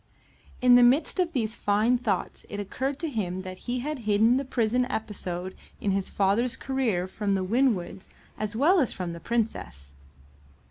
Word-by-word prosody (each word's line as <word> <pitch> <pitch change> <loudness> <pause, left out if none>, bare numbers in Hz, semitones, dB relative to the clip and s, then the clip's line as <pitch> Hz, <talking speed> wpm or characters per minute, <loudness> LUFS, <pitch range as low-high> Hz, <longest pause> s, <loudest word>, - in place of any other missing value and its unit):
In 250 0 +7
the 245 - +8
midst 260 +10 +3
of 355 -2 +1
these 225 -8 -1
fine 215 +4 +2
thoughts 205 -6 -2
it 205 - -5
occurred 260 +7 -3
to 330 - -1
him 190 - -3
that 185 0 -8
he 245 0 -1
had 300 +1 -3
hidden 220 +2 +3
the 275 - -1
prison 250 -1 0
episode 185 -5 -4 0.3
in 200 - 0
his 195 0 -1
father's 205 +5 +1
career 235 -10 -1
from 200 +1 -2
the 190 -1 0
Winwoods 200 -5 0 0.3
as 215 +1 -4
well 330 - +4
as 265 - +1
from 180 -2 -4
the 170 - -7
Princess. 90 - -3
220 Hz, 175 wpm, -27 LUFS, 190-250 Hz, 0.3 s, the